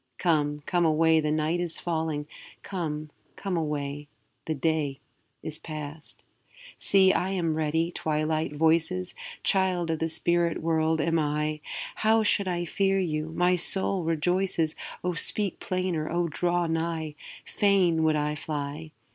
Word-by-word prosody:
Come, 150 -3 +1
come 175 -1 +1
away, 160 0 +4
the 150 -1 0
night 155 +3 +1
is 175 -2 -1
falling; 160 -3 -2 0.4
'Come, 155 -5 -4 0.2
come 195 -2 -3
away, 145 -2 -3 0.4
the 160 - -1
day 145 -1 0 0.4
is 155 -1 -5
past.' 155 -1 -8 0.6
See, 190 -1 +5
I 185 - 0
am 175 -4 0
ready, 160 +2 0
Twilight 155 -1 -1
voices! 165 +4 +1 0.3
Child 185 -3 +2
of 160 - -1
the 165 - 0
spirit 170 +1 +1
world 160 -1 +2
am 165 +1 +2
I; 150 0 -1 0.4
How 220 0 +3
should 200 -2 +2
I 175 -1 -1
fear 195 +3 +1
you? 160 -4 -1
my 180 +1 +3
soul 190 +1 +1
rejoices, 165 0 +1 0.3
O 180 0 0
speak 195 +3 +1
plainer! 185 -4 -1
O 170 +1 0
draw 175 +2 0
nigh! 160 -1 -2 0.3
Fain 190 -5 +3
would 160 -1 +3
I 150 0 0
fly! 150 +1 -5
160 Hz, 140 wpm, -27 LUFS, 155-175 Hz, 0.6 s, See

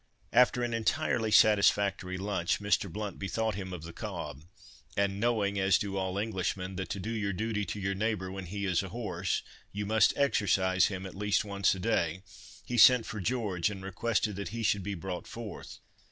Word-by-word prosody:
After 125 0 +4
an 120 -1 -1
entirely 115 0 0
satisfactory 100 -3 +4
lunch, 95 -3 -1
Mr. 100 -2 +1
Blount 105 +2 -5
bethought 110 +3 -1
him 95 -1 -5
of 90 -4 -6
the 85 0 -8
cob—and 90 - -5
knowing, 105 -3 +1
as 95 -2 +4
do 100 -1 -4
all 95 0 -2
Englishmen, 95 -3 -2
that 95 - -4
to 100 - -3
do 110 +5 -4
your 105 -3 -1
duty 105 +1 -2
to 100 - -5
your 95 0 -1
neighbour 100 -2 -2
when 95 -1 -6
he 100 +3 -4
is 90 -3 +2
a 95 - -6
horse, 115 +2 -2 0.3
you 105 +1 -3
must 110 +2 +3
exercise 95 -8 +3
him 95 -2 -5
at 95 - -7
least 105 +1 0
once 100 -1 +1
a - - -7
day, 90 -4 0 0.4
he 120 -1 -1
sent 125 0 +8
for 110 - -5
George, 105 -5 0
and 95 -2 -7
requested 105 +1 -1
that 100 - -4
he 115 0 -4
should 100 -2 +2
be 100 +2 -4
brought 90 +1 -5
forth. 115 -3 -8
100 Hz, 190 wpm, -30 LUFS, 95-110 Hz, 0.4 s, sent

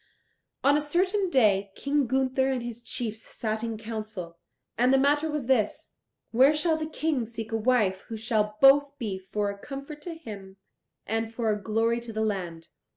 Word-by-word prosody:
On 280 +1 +5
a 300 - +2
certain 370 +6 +1
day 205 - +3
King 280 -1 0
Gunther 265 +1 +1
and 255 -3 -1
his 240 0 -6
chiefs 225 -2 -3
sat 220 -1 -4
in 225 -1 -3
council, 215 -6 -6 0.4
and 250 +2 +3
the 270 - +5
matter 290 +3 +2
was 300 -4 -2
this 245 -5 0 0.4
where 265 +6 +5
shall 320 +1 +2
the 315 0 -3
King 310 -5 -1
seek 225 0 -7
a - - 0
wife 215 -5 +2
who 225 - -5
shall 215 -2 0
both 285 +1 +6
be 205 -7 -3
for 205 -1 0
a 200 - -10
comfort 280 +4 -8
to 335 +2 -6
him 200 -10 -10 0.5
and 225 +1 -2
for 230 -1 0
a 210 -1 -2
glory 225 +2 +1
to 235 -1 -7
the 220 0 -1
land? 175 -6 -4
235 Hz, 185 wpm, -27 LUFS, 215-280 Hz, 0.5 s, both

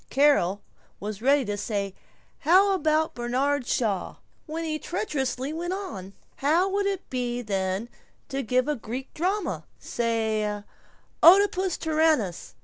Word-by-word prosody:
Carol 265 -9 +3 0.4
was 210 0 -5
ready 275 +1 +3
to 205 -1 -2
say, 200 -2 -3 0.5
"How 375 +6 +5
about 315 -3 +1
Bernard 255 +3 0
Shaw?" 205 -6 -1 0.3
when 320 +2 -4
he 310 -1 -2
treacherously 280 - -2
went 345 +3 -3
on, 200 - -6 0.2
"How 325 +7 +3
would 400 +1 0
it 390 -2 -3
be 245 -1 -2
then 195 +1 -1 0.4
to 275 0 -2
give 255 +2 +1
a 300 - +1
Greek 250 +2 -6
drama 370 +3 -1
say 220 -3 -1 0.6
'Oedipus 375 0 +6
Tyrannus'?" 310 - +1
270 Hz, 130 wpm, -26 LUFS, 220-325 Hz, 0.6 s, Oedipus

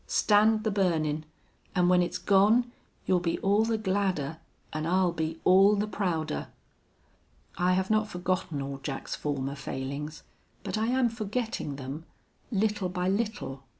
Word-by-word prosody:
Stand 215 +1 +4
the 220 - 0
burnin'. 160 -6 0 0.5
An' 180 -1 +3
when 180 0 +5
it's 175 +1 -1
gone 215 +6 +4 0.3
you'll 185 - +3
be 170 -1 -1
all 205 +3 +3
the 225 0 0
gladder 185 -7 -1 0.3
an' 155 +1 -2
I'll 185 0 +3
be 160 0 -3
all 195 +3 +6
the 205 +1 0
prouder.'... 170 -7 -2 1.1
I 180 +1 +2
have 190 +2 0
not 215 0 +2
forgotten 180 -6 -2
all 135 0 -5
Jack's 135 -1 -4
former 140 -2 -2
failings, 140 +2 -5 0.4
but - - -3
I 220 +1 0
am 255 0 +3
forgetting 220 - -3
them, 140 +4 -7 0.4
little 210 -3 0
by 180 0 -1
little. 200 - -2
185 Hz, 150 wpm, -28 LUFS, 155-210 Hz, 1.1 s, all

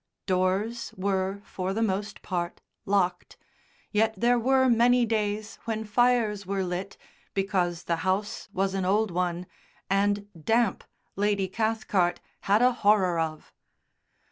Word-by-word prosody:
Doors 190 +5 0
were, 195 +1 -1
for 190 0 -3
the 225 - +1
most 205 0 -2
part, 175 -2 -3 0.3
locked, 185 -3 0 0.5
yet 220 +1 +2
there 240 +4 +3
were 260 +2 +3
many 240 +1 +4
days 215 -1 -2
when 220 -1 -2
fires 220 -2 +2
were 195 0 -2
lit 185 +2 -4 0.4
because 180 -3 0
the 170 - -1
house 190 +6 -2
was 195 0 0
an 195 -1 -1
old 205 +2 +2
one, 175 0 -1 0.5
and 205 +1 +1 0.2
damp 225 +1 +2 0.3
Lady 200 -1 +1
Cathcart 205 -4 0 0.2
had 205 +4 +2
a 250 - +6
horror 200 -6 +3
of. 160 -1 -4
200 Hz, 130 wpm, -27 LUFS, 185-220 Hz, 0.5 s, a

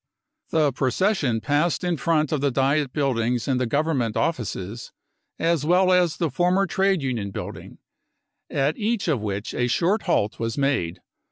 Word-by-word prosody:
The 155 -3 +2
procession 135 - +1
passed 150 +8 +1
in 175 -1 0
front 155 -1 +1
of 150 -3 0
the 140 - +2
Diet 135 +2 +1
buildings 125 -4 0
and 130 -2 +1
the 125 - 0
Government 140 -4 0
offices, 115 - -3 0.5
as 165 -3 +1
well 180 +4 +3
as 180 -3 +3
the 165 -4 -1
former 180 +7 +2
trade 190 -3 +1
union 120 -7 -2
building, 95 - -8 0.7
at 140 +2 0
each 220 -1 -1
of 145 -9 +1
which 100 0 -4
a 125 - 0
short 180 - +1
halt 105 -10 +1
was 115 -1 -2
made. 135 -12 0
145 Hz, 160 wpm, -24 LUFS, 120-170 Hz, 0.7 s, well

